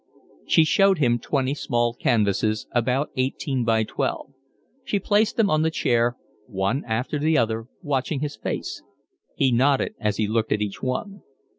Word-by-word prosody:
She 160 - +5
showed 195 +4 +4
him 120 -5 +2
twenty 135 +1 -1
small 120 -5 0
canvases, 110 -2 +1
about 125 +4 0
eighteen 130 0 -1
by 110 -1 +2
twelve. 135 +5 -3 0.5
She 210 - -1
placed 210 +4 +1
them 225 -3 +4
on 155 0 +3
the 160 - +2
chair, 120 -5 +1 0.3
one 100 +8 -1
after 125 +6 -2
the 155 +2 +2
other, 115 0 0 0.2
watching 140 -1 -1
his 150 -4 -3
face; 110 - -4 0.5
he 130 - +2
nodded 135 +3 +2
as 105 -1 -1
he 110 - +1
looked 110 +1 -1
at 105 - +2
each 100 -2 -6
one. 195 +10 -3
130 Hz, 160 wpm, -24 LUFS, 115-150 Hz, 0.5 s, She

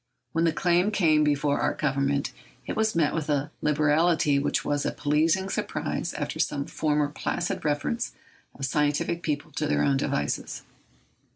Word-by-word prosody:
When 165 +3 +1
the 165 - +3
claim 175 +3 +2
came 160 -7 +3
before 145 -1 +1
our - - +1
Government, 140 -1 0 0.3
it - - -4
was 220 -2 +1
met 160 -3 +2
with 155 -2 -3
a 145 0 0
liberality 150 0 +3
which 145 - 0
was 145 -1 0
a - - 0
pleasing 155 +6 +1
surprise - - -3
after - - -4
some 140 -1 0
former 150 -1 0
placid 170 +4 -3
references 150 +10 -1 0.4
of 135 - -3
scientific 150 +4 0
people 150 -1 -3
to 150 +2 -2
their - - +1
own 140 -1 +3
devices. 75 - -2
150 Hz, 160 wpm, -26 LUFS, 145-165 Hz, 0.4 s, the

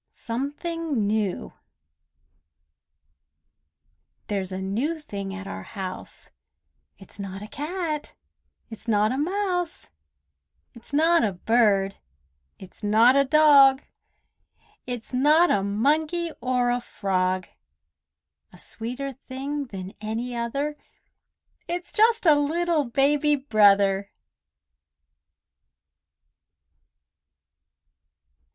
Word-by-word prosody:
SOMETHING 285 - -3
NEW 205 -2 -2 2.8
There's 195 -2 -2
a 185 - -4
new 235 +13 -2
thing 200 -9 -6
at 195 0 -7
our 95 - -6
house: 185 - -8 0.7
It's 195 +1 -15
not 195 0 -6
a - - -8
cat; 305 - -4 0.6
it's 225 +1 -11
not 215 0 +2
a 260 - -2
mouse; 360 +1 -2 0.8
It's 235 +3 -10
not 325 +4 +3
a 205 -3 0
bird; 200 -1 +2 0.6
it's 190 - -14
not 225 +5 +5
a 280 - +5
dog; 280 -2 +6 1.0
It's 245 -1 -6
not 305 +7 +4
a 200 - +2
monkey 305 - 0
or 250 0 +1
a 245 0 -1
frog; 185 -4 -1 1.0
A 180 - -16
sweeter 250 +8 -6
thing 275 +3 -5
than 195 -3 -8
any 230 +3 -4
other; 275 +6 -3 0.9
It's 350 +1 -5
just 450 0 +3
a 315 - +7
little 310 +1 +1
Baby 285 +4 +2
Brother! 200 -6 +3
250 Hz, 90 wpm, -25 LUFS, 205-300 Hz, 2.8 s, a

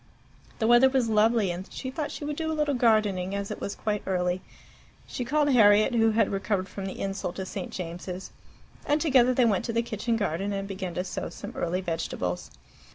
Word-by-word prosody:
The 220 - 0
weather 240 +3 +6
was 260 -3 +1
lovely, 215 -2 +3
and 180 +2 -7
she 260 - -5
thought 300 +1 -3
she 290 - -6
would 295 0 -3
do 320 +1 -2
a 315 - -2
little 300 -1 +1
gardening, 210 -6 +2
as 200 0 -3
it - - -6
was 200 - -3
quite 210 -1 -2
early. 180 -1 0 0.6
She 250 - -4
called 290 +3 +2
Harriet, 215 -2 +5
who 225 -1 +4
had 220 -1 +2
recovered 195 -1 -1
from 195 +1 -6
the 190 - -6
insult 195 -2 -3
to 190 - -4
St. 235 - -5
James's, 180 -1 -6 0.5
and 295 +1 +1
together 255 -5 +4
they 250 - +4
went 205 -5 +2
to 230 - -2
the 230 +1 +1
kitchen 230 +1 -1
garden 200 0 -1
and 195 0 -3
began 190 -3 -5
to 180 - -1
sow 185 - -4
some 205 +4 -8
early 180 +2 -1
vegetables. 125 - -3
210 Hz, 210 wpm, -27 LUFS, 190-240 Hz, 0.6 s, weather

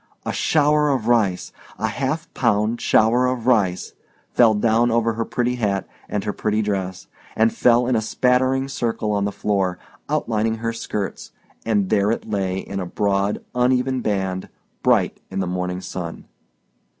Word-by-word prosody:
A - - -2
shower 150 -1 +3
of 130 -5 0
rice—a 110 -1 -1
half 140 +8 -3
pound 115 -1 +1
shower 120 +3 +3
of 125 -2 -2
rice—fell 110 +1 +1
down 115 +3 +3
over 115 0 +1
her 115 +1 -2
pretty 125 +1 -1
hat 100 -5 -1 0.2
and 105 - -2
her 105 - -2
pretty 110 0 0
dress, 95 -3 -3 0.3
and 110 +1 +3
fell 120 0 +4
in 125 0 +1
a 110 - +2
spattering 130 +3 +1
circle 115 -5 -2
on 100 -1 +1
the 100 - -1
floor, 95 -3 -1 0.3
outlining 115 -7 0
her 115 +1 -3
skirts—and 105 -1 -4
there 100 -1 +3
it 115 - -2
lay 95 -3 -1
in 95 0 -5
a 95 - -3
broad, 100 +1 0
uneven 125 +1 +1
band, 95 -4 -2 0.3
bright - - +2
in - - -4
the 95 - 0
morning 90 0 -3
sun. 90 -2 -6
110 Hz, 150 wpm, -22 LUFS, 100-125 Hz, 0.3 s, fell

